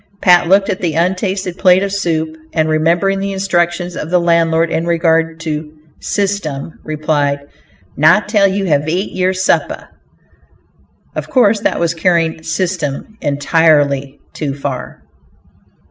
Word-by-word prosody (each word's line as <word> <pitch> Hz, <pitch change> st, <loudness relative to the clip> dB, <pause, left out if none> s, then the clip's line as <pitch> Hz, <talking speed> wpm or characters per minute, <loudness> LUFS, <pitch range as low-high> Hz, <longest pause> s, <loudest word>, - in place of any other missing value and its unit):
Pat 175 Hz, -3 st, +4 dB
looked 195 Hz, +2 st, +4 dB
at 195 Hz, -3 st, -3 dB
the 165 Hz, -4 st, -1 dB
untasted 185 Hz, +1 st, -1 dB
plate 185 Hz, 0 st, +4 dB
of 200 Hz, -, -2 dB
soup, 160 Hz, -5 st, -2 dB, 0.2 s
and 160 Hz, -1 st, +1 dB
remembering 170 Hz, +5 st, +1 dB
the 195 Hz, 0 st, -3 dB
instructions 175 Hz, -2 st, -1 dB
of 155 Hz, -, -5 dB
the 180 Hz, -, +3 dB
landlord 165 Hz, -1 st, +2 dB
in 165 Hz, +1 st, -1 dB
regard 165 Hz, -1 st, +1 dB
to 155 Hz, -1 st, -4 dB, 0.3 s
"system," 190 Hz, -8 st, -3 dB
replied: 150 Hz, -2 st, -1 dB, 0.6 s
"Not 165 Hz, +9 st, +4 dB
till 205 Hz, -2 st, +3 dB
ye 195 Hz, 0 st, -1 dB
have 150 Hz, -3 st, +1 dB
ate 180 Hz, +5 st, -2 dB
yer 185 Hz, 0 st, 0 dB
supe!" 185 Hz, 0 st, -1 dB, 1.3 s
Of -, -, -5 dB
course 225 Hz, -5 st, +3 dB
that -, -, -1 dB
was 170 Hz, -1 st, 0 dB
carrying 165 Hz, -1 st, 0 dB
"system" 160 Hz, +1 st, -3 dB
entirely 145 Hz, -2 st, +1 dB
too 140 Hz, -3 st, -4 dB
far. 130 Hz, -, -6 dB
170 Hz, 135 wpm, -15 LUFS, 155-185 Hz, 1.3 s, Pat